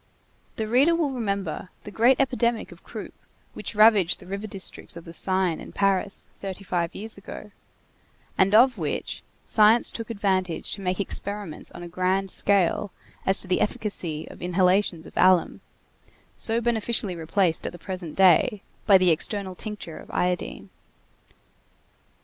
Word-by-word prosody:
The 220 - -3
reader 270 +9 +4
will 315 -4 0
remember 200 -8 -3
the 210 - -9
great 240 +5 +4
epidemic 245 -4 0
of - - -15
croup - - -8 0.4
which - - -4
ravaged 210 -5 +5
the - - -13
river 200 +3 -5
districts 190 -3 -4
of 170 - -10
the 165 - -10
Seine 185 -2 0
in - - -11
Paris 195 0 0
thirty 195 0 -5
five 175 -3 -2
years 215 0 -6
ago, 210 +1 -10 0.8
and 195 +2 +3
of 245 -1 +5
which 155 -3 -3 0.2
science 220 +2 +4
took 230 0 -6
advantage 190 -5 -1
to 200 - -3
make 185 0 -2
experiments 200 -3 -4
on 175 - -9
a - - -7
grand 185 +2 0
scale 200 0 +1 0.4
as 190 +1 +4
to - - -4
the 185 - +1
efficacy 185 -7 -2
of - - -13
inhalations 180 -1 +1
of - - -13
alum, 185 -1 +3 0.7
so 225 +1 +1
beneficially 225 -4 0
replaced 165 +1 0
at - - -4
the 175 - -10
present 180 -3 -6
day 190 +2 +4 0.2
by 200 -3 +8
the 185 -2 +4
external 190 +3 0
tincture 205 -4 -7
of - - -14
iodine. 180 -1 -2
195 Hz, 155 wpm, -25 LUFS, 180-215 Hz, 0.8 s, by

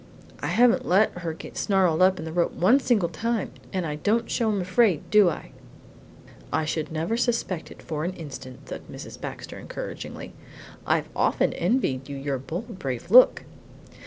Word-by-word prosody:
I - - -2
haven't 245 +1 +3
let 190 0 +3
her 170 -2 -3
get 160 - -10
snarled 185 -5 +2
up 185 0 +5
in 160 - -6
the 160 - -5
rope 170 +1 +1
one 220 +10 +4
single 225 -10 +2
time, 220 +6 -2 0.2
and 185 -2 -1
I 150 -1 -3
don't 215 +9 0
show 230 -3 +1
I'm 205 -2 0
afraid, 185 -1 +2
do 210 -4 +6
I?" - - -7 1.0
"I 160 - +1
should 155 0 -2
never 165 +8 -1
suspect 230 -8 -1
it - - -13
for 155 -1 -3
an 180 +3 -2
instant," 135 -6 -9
said - - -6
Mrs. - - -9
Baxter - - -7
encouragingly. - - -7 0.5
"I've - - +1
often - - +2
envied 170 - 0
you 140 - -5
your 135 -1 -2
bold, 185 - -6
brave 135 +4 -4
look!" 255 +2 +7
180 Hz, 175 wpm, -25 LUFS, 155-220 Hz, 1.0 s, look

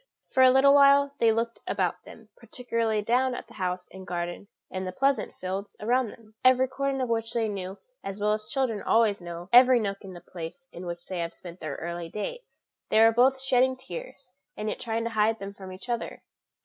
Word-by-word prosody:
For 260 - +3
a 260 - +8
little 265 +2 +6
while 280 0 +6
they 230 -1 +5
looked 230 +1 -1
about - - -1
them, - - -14
particularly 230 - -2
down 250 +3 +2
on - - -6
the - - -16
house 180 -2 -3
and 190 -1 -10
garden 175 +2 -4 0.2
and 185 0 -4
the - - -3
pleasant 275 +7 0
fields 190 +2 -5
around 245 +3 +1
them, 220 0 -14
every 255 0 +5
corner 275 0 -1
of 250 - -3
which 225 0 -1
they 230 -2 +1
knew 195 -2 -5 0.3
as 195 +1 -6
well 210 +1 +2
as 215 0 -4
children 245 -6 -1
always 220 -4 +2
know 175 0 -7
every 250 0 +8
nook 200 -2 -2
in 190 -1 -9
the 175 - -9
place 175 +9 -9
in 180 +1 -8
which 175 0 -6
they 185 -2 -4
have 170 0 -3
spent 175 0 -11
their 150 -3 -5
early 170 0 -5
days. 480 - -7 0.3
They 220 - +4
were 225 0 +7
both 260 +3 +4
shedding 260 0 +2
tears, - - -9 0.3
and 215 - -2
yet - - -4
trying 230 -1 -2
to 230 - -3
hide 220 0 +2
them 200 -1 -7
from 190 -2 -10
each 185 +5 -11
other. 235 -1 -4
220 Hz, 215 wpm, -27 LUFS, 185-255 Hz, 0.3 s, a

